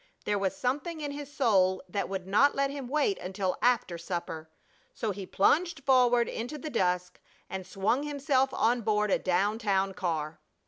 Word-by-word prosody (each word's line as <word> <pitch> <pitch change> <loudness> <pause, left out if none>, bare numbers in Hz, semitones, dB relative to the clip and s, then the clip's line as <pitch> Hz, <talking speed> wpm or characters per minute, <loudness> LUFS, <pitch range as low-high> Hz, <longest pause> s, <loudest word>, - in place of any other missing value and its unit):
There 205 -1 +1
was 195 -1 -1
something 295 +6 -2
in 290 -2 -3
his 285 0 -7
soul 195 -9 +2
that 200 +2 -3
would 190 -2 -4
not 210 +10 +4
let 275 0 +1
him 280 -3 -6
wait 305 - +1
until 185 0 -3
after 230 -8 +1
supper. 170 -2 -5 0.5
So 220 - -2
he 195 -1 -7
plunged 320 - +2
forward 245 -3 +4
into 245 +7 -5
the 305 +1 -6
dusk 180 -3 -1 0.3
and 190 -1 -5
swung 195 +8 0
himself 280 -2 +1
on 235 +2 +1
board 210 -1 +1
a - - +3
down 200 +4 +1
town 195 -3 +1
car. 165 -4 -3
215 Hz, 175 wpm, -29 LUFS, 190-275 Hz, 0.5 s, not